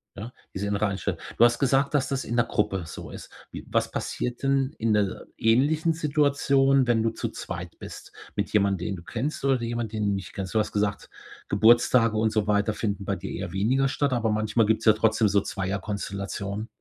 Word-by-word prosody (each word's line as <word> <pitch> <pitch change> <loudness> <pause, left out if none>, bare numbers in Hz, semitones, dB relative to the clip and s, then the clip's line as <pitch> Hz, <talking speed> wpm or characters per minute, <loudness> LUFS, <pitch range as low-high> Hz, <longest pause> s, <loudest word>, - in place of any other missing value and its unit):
ja, 115 +5 -8 0.2
diese 100 +1 -3
innere 105 +1 +1
Einstellung. 95 -3 -3 0.2
Du 120 - +7
hast 120 - +2
gesagt, 135 +1 +2
dass 145 -3 +1
das 135 -1 -2
in 120 - -3
'ner 120 - +4
Gruppe 105 -5 -1
so - - -8
ist. - - -10 0.2
Wie - - -8
was - - +1
passiert 125 +1 -4
denn 135 0 +1
in 115 0 0
'ner 105 -2 0
ähnlichen 150 +8 +2
Situation, 140 -3 +2
wenn 115 -2 +2
du 115 - +1
zu - - -4
zweit - - -7
bist - - -10 0.2
mit - - -2
jemand, 100 -3 +2
den 95 +2 -2
du 85 - -11
kennst 135 +7 -4
oder 135 -1 +3
de 115 - -3
jemand, 120 -2 -3
den 105 -1 -1
du - - +2
nicht 95 -2 -5
kennst? 95 0 -5
Du - - +4
hast 105 - -1
gesagt, 105 0 -1 0.4
Geburtstage 115 +1 +4
und 110 0 +2
so 105 -1 0
weiter 105 +1 +2
finden 105 -2 -3
bei 100 - -1
dir - - -7
eher 95 -1 -5
weniger 125 +8 +2
statt, 140 +1 0
aber 115 -3 +1
manchmal 110 +1 +1
gibt's 110 +2 0
ja 110 - +7
trotzdem 110 0 +2
so 100 +1 +3
Zweierkonstellationen. 100 +1 -4
110 Hz, 210 wpm, -26 LUFS, 100-130 Hz, 0.4 s, Du